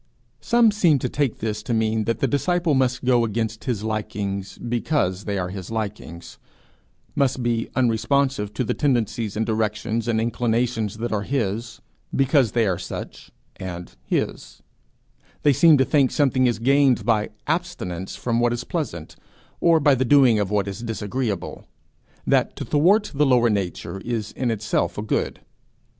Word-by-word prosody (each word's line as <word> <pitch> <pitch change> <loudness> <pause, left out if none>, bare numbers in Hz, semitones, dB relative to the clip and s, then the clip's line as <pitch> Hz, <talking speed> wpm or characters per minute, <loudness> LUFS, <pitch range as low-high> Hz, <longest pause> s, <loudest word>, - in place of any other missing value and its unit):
Some 235 -2 +4
seem 175 -8 +3
to 125 -1 -2
take 140 -3 -1
this 105 -1 -3
to 115 +2 -2
mean 110 -1 0
that 115 0 -2
the - - +3
disciple 170 +2 +1
must 130 -1 +1
go 125 -2 +4
against 110 0 -3
his 115 -6 -2
likings 100 -3 -3
because 120 - -1
they 100 -1 -2
are 90 -1 -2
his 95 -1 -7
likings; 105 -6 -6 0.7
must 135 -3 0
be 115 -1 -1
unresponsive 125 -1 +1
to 130 - 0
the - - -1
tendencies 115 -6 -1
and 110 - 0
directions 110 +1 -1
and 115 -2 +1
inclinations 115 -1 -1
that 120 +2 -3
are 105 -2 0
his, 115 -1 -3 0.3
because 135 -3 +3
they 115 -2 +2
are 95 -3 0
such, - - -7 0.3
and 90 -2 -7
his; - - -3 0.8
they 145 - +5
seem 160 +2 +6
to 130 - +3
think 140 -3 +3
something 130 -3 +2
is 120 - 0
gained 135 +2 +3
by 110 -3 +1 0.2
abstinence 150 - -3
from 120 -1 -1
what 120 0 +2
is 120 +1 -3
pleasant, 150 - -5 0.4
or 165 -1 +4
by 145 -1 +4
the 130 0 +1
doing 130 -4 +5
of 100 -2 -1
what 105 -1 0
is 100 +2 -5
disagreeable 110 -2 -4 0.6
that - - +2
to - - -5
thwart 185 +9 +3
the 145 +1 +2
lower 120 -3 +4
nature 95 -1 -3
is 115 -3 -3
in 125 -2 -2
itself 105 -2 -1
a 105 - -3
good. 110 - -2
115 Hz, 165 wpm, -23 LUFS, 105-135 Hz, 0.8 s, seem